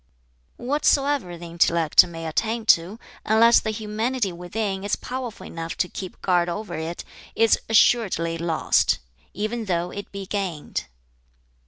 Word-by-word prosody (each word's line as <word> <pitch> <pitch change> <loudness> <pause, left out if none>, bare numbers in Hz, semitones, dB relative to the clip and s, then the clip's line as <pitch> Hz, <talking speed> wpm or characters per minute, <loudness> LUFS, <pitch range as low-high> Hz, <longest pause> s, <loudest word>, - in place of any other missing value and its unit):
"Whatsoever 275 - +1
the 170 - -9
intellect 170 -2 +4
may 165 -1 -7
attain 220 +8 -1
to, 175 +6 -5 0.3
unless 230 +2 +5
the 220 - -4
humanity 220 +1 -2
within 190 +3 -3
is 205 - 0
powerful 250 -3 -6
enough 165 0 -6
to 180 - +1
keep 185 0 -8
guard 175 -2 +2
over 200 +1 -5
it, 160 +1 -5 0.3
is 225 0 +4
assuredly 200 -7 +3
lost, 165 -1 +2 0.4
even 220 +2 -3
though 175 -2 -1
it 200 - -8
be 200 -1 -6
gained. 185 -6 -3
195 Hz, 135 wpm, -24 LUFS, 170-225 Hz, 0.4 s, unless